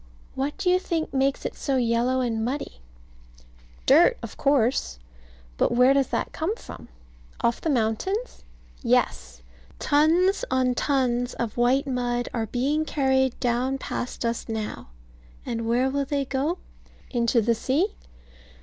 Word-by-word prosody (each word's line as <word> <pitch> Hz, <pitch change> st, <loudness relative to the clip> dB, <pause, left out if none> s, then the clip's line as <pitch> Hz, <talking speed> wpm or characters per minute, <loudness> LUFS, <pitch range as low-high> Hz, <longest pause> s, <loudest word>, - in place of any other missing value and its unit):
What 275 Hz, +2 st, -3 dB
do 395 Hz, -2 st, -3 dB
you 365 Hz, 0 st, +4 dB
think 330 Hz, -5 st, -3 dB
makes 270 Hz, +1 st, 0 dB
it -, -, -2 dB
so 275 Hz, -, -1 dB
yellow 245 Hz, +2 st, +1 dB
and 225 Hz, -3 st, -1 dB
muddy? 255 Hz, -, -4 dB, 1.0 s
Dirt, 345 Hz, -, +6 dB
of -, -, -7 dB
course. 255 Hz, -, +1 dB, 0.6 s
And 240 Hz, -, +2 dB
where 250 Hz, +2 st, +6 dB
does 275 Hz, -1 st, +2 dB
that -, -, -2 dB
come 345 Hz, +7 st, -2 dB
from? -, -, -11 dB, 0.5 s
Off 235 Hz, 0 st, +1 dB
the 325 Hz, -, -1 dB
mountains? 280 Hz, -, -1 dB, 0.4 s
Yes. -, -, 0 dB, 0.3 s
Tons 340 Hz, +9 st, +3 dB
on 255 Hz, -1 st, +2 dB
tons 245 Hz, -3 st, 0 dB
of 230 Hz, -3 st, -3 dB
white 245 Hz, +3 st, +2 dB
mud 245 Hz, -2 st, -1 dB
are 225 Hz, -2 st, -1 dB
being 275 Hz, +7 st, 0 dB
carried 265 Hz, -4 st, +1 dB
down 250 Hz, +2 st, 0 dB
past 250 Hz, -2 st, -4 dB
us 230 Hz, 0 st, -2 dB
now; 220 Hz, -, -4 dB, 0.6 s
and 230 Hz, -1 st, -3 dB
where 245 Hz, +3 st, +2 dB
will 280 Hz, +1 st, -1 dB
they 280 Hz, 0 st, -1 dB
go? 275 Hz, +7 st, -1 dB, 0.5 s
Into 235 Hz, -1 st, +2 dB
the 230 Hz, +1 st, +2 dB
sea? 280 Hz, -, 0 dB
260 Hz, 140 wpm, -25 LUFS, 235-285 Hz, 1.0 s, Dirt